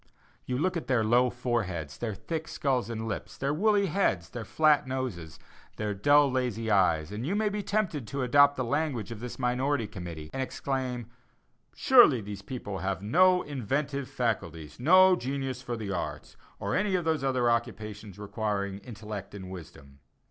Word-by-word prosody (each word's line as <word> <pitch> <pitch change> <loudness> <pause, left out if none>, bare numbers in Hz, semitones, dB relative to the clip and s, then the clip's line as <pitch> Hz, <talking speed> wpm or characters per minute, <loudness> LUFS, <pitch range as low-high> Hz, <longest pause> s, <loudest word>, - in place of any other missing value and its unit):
You 125 - -1
look 185 +6 0
at 170 - -4
their 125 -4 +2
low 120 +3 +4
foreheads, 100 - -3
their 110 -4 -3
thick 160 - -4
skulls 130 -6 -1
and 115 -1 -4
lips, 105 - -5
their 140 +2 -1
woolly 205 +4 +3
heads, 150 - 0
their 120 - -6
flat 150 +4 +3
noses, 125 - -4 0.4
their 105 -1 -2
dull, 145 +7 +4
lazy 120 -4 -1
eyes, 85 -4 +3
and 105 +3 -4
you 175 +9 -1
may 215 0 +1
be 205 0 -3
tempted 195 - -1
to 140 +3 -3
adopt 140 +3 +5
the 130 - -1
language 120 -4 -1
of 115 - -6
this 125 +1 -7
minority 130 0 0
committee, 85 -7 -8
and 135 - -2
exclaim: 130 -2 -3 0.7
Surely 240 - +6
these 100 -1 -7
people 100 -3 -6
have 95 0 -2
"no 180 - +4
inventive 140 +1 -2
faculties, 85 -10 -3
no 185 +7 +6
genius 135 -2 -3
for 120 -2 -4
the 105 -3 -4
arts, 90 -3 -5 0.2
or 100 - -3
for - - +1
any 200 -1 +1
of 175 -2 -1
those 160 -3 0
occupations 115 -5 -1
requiring 100 -1 -3
intellect 105 -3 -8
and 95 -2 -8
wisdom." 70 -6 -11
120 Hz, 170 wpm, -29 LUFS, 100-140 Hz, 0.7 s, Surely